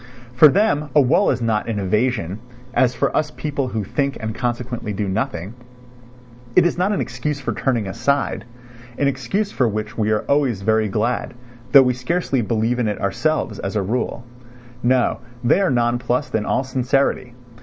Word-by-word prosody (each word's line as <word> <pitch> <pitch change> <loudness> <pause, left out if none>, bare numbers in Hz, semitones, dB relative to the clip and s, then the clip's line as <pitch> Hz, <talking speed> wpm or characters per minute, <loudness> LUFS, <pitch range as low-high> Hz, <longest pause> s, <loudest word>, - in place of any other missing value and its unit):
For 130 +5 +8
them 150 -3 +2
a - - +7
wall 145 +9 +3
is 120 - 0
not 110 -1 0
an 110 - -2
evasion, 105 -1 0 0.3
as 125 0 +2
for - - 0
us 150 - +1
people 145 -4 -3
who 110 -4 -3
think 140 +7 -1
and 110 -1 -4
consequently 120 -2 -3
do 100 +1 -2
nothing; 105 -2 -3 1.0
it - - +6
is 175 - +2
not 185 +3 +1
an 205 - 0
excuse 140 +4 -3
for 135 - -3
turning 120 -6 0
aside, 120 +1 -1 0.5
an 140 - +2
excuse 140 - -1
for 125 - +1
which 110 +1 -4
we 105 -1 +1
are 110 -1 +2
always 135 -9 +1
very 110 +1 +2
glad, 115 +5 -1 0.4
though 140 -2 +9
we 125 -1 +2
scarcely 135 +1 -1
believe 115 +2 0
in 120 - +1
it 105 - -2
ourselves, 105 +2 -1
as 100 +2 -4
a 105 - +1
rule. 120 +3 -2 0.6
No, 125 0 +2 0.2
they 120 +11 +3
are 195 - +2
nonplussed 120 +2 0
in 105 -1 0
all 130 - +1
sincerity. 130 -1 0
120 Hz, 175 wpm, -21 LUFS, 110-140 Hz, 1.0 s, though